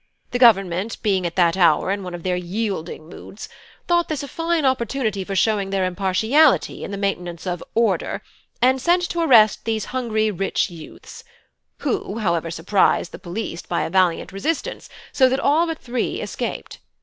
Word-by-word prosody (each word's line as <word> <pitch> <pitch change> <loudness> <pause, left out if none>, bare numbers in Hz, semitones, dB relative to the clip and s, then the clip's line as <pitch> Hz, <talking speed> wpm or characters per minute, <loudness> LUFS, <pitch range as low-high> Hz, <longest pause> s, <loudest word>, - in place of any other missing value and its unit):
The 245 - -1
Government, 195 -3 +3
being 190 -4 +1
at 170 - -7
that 175 -2 +3
hour 170 -1 +3
in 200 0 -2
one 180 -2 -6
of 170 - -9
their 185 -1 0
yielding 180 -3 -4
moods, 195 +4 -10 0.4
thought 345 -1 +2
this 300 -3 -2
a - - -6
fine 330 +2 -1
opportunity 235 -5 0
for 195 +1 -5
showing 200 0 +1
their 195 -1 0
impartiality 205 - +2
in - - -5
the 200 - -5
maintenance 180 -4 -3
of 180 -2 -3
'order,' 230 0 0 0.4
and 260 +1 +4
sent 350 +3 +2
to 340 - -1
arrest 225 -10 +5
these 220 -1 -2
hungry 220 -4 0
rich 195 0 -1
youths; 165 -2 -12 0.6
who, 400 - -2
however, 170 -6 0
surprised 175 +2 +1
the - - -9
police 175 -1 -5
by 170 - -2
a 160 - -4
valiant 185 -2 +2
resistance, 240 - -3 0.2
so 260 -2 +4
that 265 +1 0
all 310 +5 +3
but 325 -1 -3
three 245 -3 -3
escaped. - - -5
205 Hz, 175 wpm, -22 LUFS, 180-255 Hz, 0.6 s, arrest